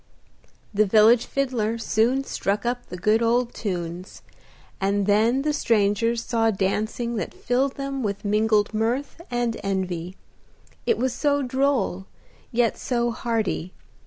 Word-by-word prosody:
The 210 +1 +3
village 225 +3 +5
fiddler 240 -5 -1
soon 230 +4 +1
struck 200 -5 -2
up 245 0 -2
the 180 - -7
good 215 +5 +2
old 240 +1 +1
tunes, 180 -3 -5 0.6
and 200 +1 +1
then 225 +6 +3
the 300 0 +1
strangers 230 -2 +1
saw 230 -2 +2
dancing 215 +4 -1
that - - -4
filled 260 +3 0
them 275 -1 -4
with 205 -2 -3
mingled 210 0 +2
mirth 240 +9 -1
and 240 -2 -1
envy; 185 -2 -3 0.7
it 465 - +3
was 255 -1 0
so 285 +2 +1
droll, 260 -7 0 0.4
yet 235 -1 +1
so 240 -1 0
hearty. 220 -6 -2
225 Hz, 130 wpm, -24 LUFS, 205-245 Hz, 0.7 s, village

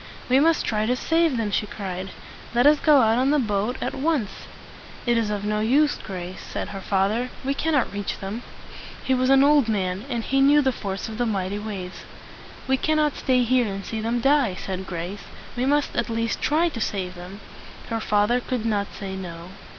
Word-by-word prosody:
"We 260 +2 +5
must 325 +2 +3
try 215 -1 0
to 250 - +2
save 325 0 +1
them!" 220 -3 -1
she 210 - 0
cried. 190 -2 -5 0.5
"Let 245 +2 +4
us 295 0 +6
go 295 -4 +5
out 225 +1 +3
in 265 - +2
the 300 - +3
boat 220 -1 0
at - - -2
once!" 270 -8 -2 0.6
"It 240 -1 +3
is 225 -2 +1
of 205 -1 -3
no 210 0 0
use, 280 +7 +2
Grace," 185 -2 -7
said - - -5
her 195 -1 -6
father. 205 +6 0 0.2
"We 275 - +1
cannot 290 -6 0
reach 205 0 -3
them." 200 +4 -5 0.6
He 265 - +1
was 255 0 +2
an 270 0 +6
old 285 -4 +4
man, 190 0 -1
and 235 -3 -2
he 270 +3 +1
knew 290 +2 +5
the 265 - +2
force 195 -5 -5
of 220 +1 -7
the 245 - +1
mighty 200 -1 -2
waves. 195 -4 -6 0.6
"We 265 0 +3
cannot 305 0 +1
stay 255 -1 +2
here 245 0 +2
and 195 -1 -5
see 220 -1 -4
them 235 +2 -1
die," 270 -7 +3
said 190 0 -5
Grace. 180 +3 -5 0.3
"We 250 +1 0
must 290 +1 +1
at 240 - 0
least 230 0 -1
try 325 +3 +2
to 235 -8 -6
save 185 -4 -2
them." 180 +3 -10 0.5
Her 225 - 0
father 210 +3 +2
could 245 -2 -3
not 205 -3 0
say, 195 -1 -5
"No." 175 -2 -7
225 Hz, 205 wpm, -24 LUFS, 200-265 Hz, 0.6 s, us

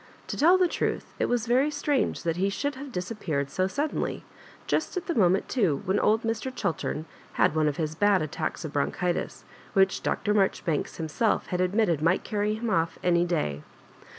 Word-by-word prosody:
To - - -2
tell 345 +5 +5
the 365 -1 +4
truth, - - -2
it - - +2
was 240 -2 0
very 255 +5 +3
strange 290 -2 0
that 165 -1 -1
he 195 +2 +1
should 285 +8 -2
have 275 +1 -8
disappeared 180 - -3
so 185 0 +1
suddenly, 290 +10 -2 0.2
— - - -22
just - - 0
at 365 - -3
the 340 - -1
moment 190 - +3
too, 185 - +1
when 190 +2 +1
old 220 +2 +2
Mr. 225 +3 -2
Chiltem 170 -8 -2 0.3
had - - +3
one 155 -1 +3
of 145 - -1
his 155 -2 -2
bad 200 0 +3
attacks 155 +2 -4
of 155 - -6
bronchitis, 175 +4 -1 0.3
which 190 0 +3
Dr. 210 0 0
Maijoribanks 190 -6 0
himself 165 +7 0
had 180 -1 0
admitted 185 -4 +2
might 170 +4 +2
carry 210 0 -1
him 225 0 -3
off 165 -2 +1
any 175 -1 +3
day. 75 - -1
190 Hz, 190 wpm, -27 LUFS, 165-230 Hz, 0.3 s, tell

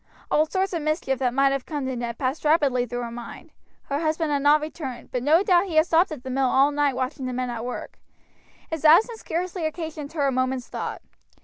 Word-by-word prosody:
All 310 +1 +3
sorts 380 +2 -1
of 335 - -1
mischief 305 -3 -1
that 255 -2 +1
might 275 +2 +3
have 275 -2 -3
come 290 -3 -3
to 260 -1 -2
Ned 235 -1 -4
passed 265 +3 -2
rapidly 285 -6 +2
through 245 +1 -4
her 235 - -5
mind; 240 +6 -9 0.3
her 280 0 -2
husband 315 0 0
had 285 -1 +1
not 290 +2 +5
returned, 300 -4 -7
but 250 - -2
no 315 +8 +4
doubt 365 -2 +4
he 335 - -5
had 315 0 +5
stopped 340 +1 +3
at 285 -5 -7
the 260 - -5
mill 265 0 +2
all 275 +3 +4
night 290 -2 +1
watching 260 +1 -3
the 255 - -3
men 250 0 -2
at 230 -1 -5
work. 250 0 -6 0.7
His 320 -2 -4
absence 430 +9 +5
scarcely 350 +1 -3
occasioned 315 -2 -6
her 295 -4 0
a 275 - +2
moment's 255 -1 -1
thought. - - -5
290 Hz, 230 wpm, -24 LUFS, 255-320 Hz, 0.7 s, not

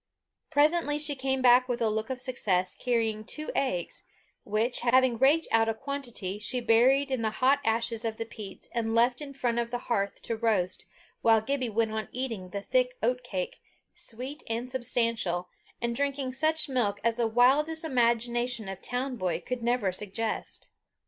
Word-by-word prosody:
Presently 295 0 +3
she 295 0 +2
came 265 -1 -1
back 250 +1 +6
with 245 0 -1
a 230 - +2
look 220 +2 -1
of 260 -1 -3
success, 200 -8 0
carrying 225 -3 -1
two 305 +7 -2
eggs, 180 -11 -1 0.4
which, 220 +4 0
having 250 -1 +3
raked 290 +5 +4
out 225 0 +4
a 225 - -1
quantity, 240 -7 -4
she 250 +4 0
buried 250 +4 +4
in 260 -3 0
the 220 - +1
hot 270 +2 +4
ashes 230 0 0
of 225 -1 -2
the 225 - -3
peats, 210 -4 -9
and 225 -1 -1
left 240 +3 +3
in 290 -2 -6
front 245 -3 -1
of 235 0 -1
the 245 - -2 0.2
hearth 200 -2 -2
to 230 - -2
roast, 210 -6 0 0.3
while 225 -1 +5
Gibbie 255 +2 -2
went 220 0 0
on 220 0 -3
eating 230 -8 -4
the 200 +2 -5
thick - - +1
oatcake, 245 -7 -2 0.3
sweet 285 -3 -6
and 230 +2 -2
substantial, 230 -8 -1 0.3
and 235 0 -1
drinking 275 -1 -1
such 315 +3 +2
milk 230 -7 0
as 230 0 +1
the 235 -1 +2
wildest 285 +8 +3
imagination 240 -3 +1
of 195 -1 -6
town 255 +1 -2
boy 180 -5 -1
could 250 +7 -4
never 235 -4 +1
suggest. 210 +4 -3
240 Hz, 175 wpm, -28 LUFS, 220-260 Hz, 0.4 s, back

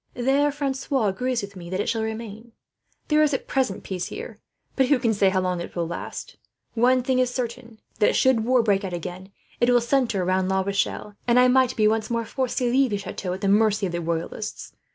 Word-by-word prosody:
There 275 +4 +2
Francois 270 -4 -1
agrees 250 +4 -1
with 200 0 -8
me 170 -2 -9
that 185 +1 -2
it - - -1
should 225 -1 0
remain. 220 +1 -6 0.6
"There 305 0 +4
is 295 -2 +3
at - - -4
present 260 -8 -1
peace 180 -2 -4
here, 460 +3 -8 0.4
but 265 -2 +3
who 285 - +4
can 230 -3 +1
say 200 -2 +3
how 190 0 +1
long 180 -1 -1
it - - -8
will 170 -1 -1
last? 170 - -7 0.4
One 250 +2 +3
thing 255 0 +1
is 255 -1 +2
certain, 235 -2 -5 0.2
that 210 - +3
should 260 -4 +3
war 250 0 +3
break 200 -2 +2
out 185 -2 -4
again, 180 +2 -6 0.3
it 240 - +3
will 245 0 +5
centre 235 -6 +1
round 185 +1 +1
La 190 0 +2
Rochelle; 200 +1 -2
and 240 +1 +5
I 250 - +6
might 260 0 +3
be 215 -1 +3
once 220 0 0
more 230 -1 -1
forced 260 +1 -3
to 245 -2 +1
leave 265 +1 +3
the 205 - -1
chateau 190 -1 -5
at 190 - -6
the 200 - 0
mercy 210 0 +3
of 180 - -2
the 170 0 -3
Royalists. 170 +6 -4
225 Hz, 230 wpm, -24 LUFS, 195-255 Hz, 0.6 s, I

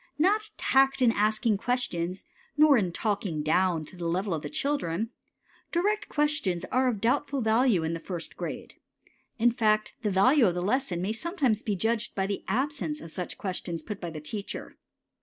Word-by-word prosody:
Not 420 +7 +2
tact 270 0 +3
in 235 - +6
asking 215 0 +1
questions, 185 -8 -1 0.3
nor 300 -1 +7
in 190 -7 +1
"talking 195 -6 -1
down" 165 0 +2
to 185 - -14
the 175 -1 -4
level 185 +3 0
of 155 - -2
the 145 - -5
children. 225 - -1 0.6
Direct 415 +5 0
questions 295 - 0
are 255 +1 +3
of 235 -5 0
doubtful 275 +5 +1
value 220 -5 +3
in 160 +1 -1
the 165 - -3
first 170 0 -6
grade. - - -6 0.6
In 240 +1 +4
fact, 215 -2 +1
the 215 - 0
value 235 +7 +5
of 175 - 0
the 175 - -2
lesson 200 -5 0
may 200 - 0
sometimes 265 - 0
be 210 - -1
judged 225 +4 -1
by 190 - 0
the 200 0 -3
absence 290 +7 -1
of 165 - -10
such 180 0 -5
questions 180 -3 -4
put 210 -2 -6
by 175 - -3
the 155 -1 -7
teacher. 200 +7 -6
215 Hz, 180 wpm, -28 LUFS, 180-265 Hz, 0.6 s, nor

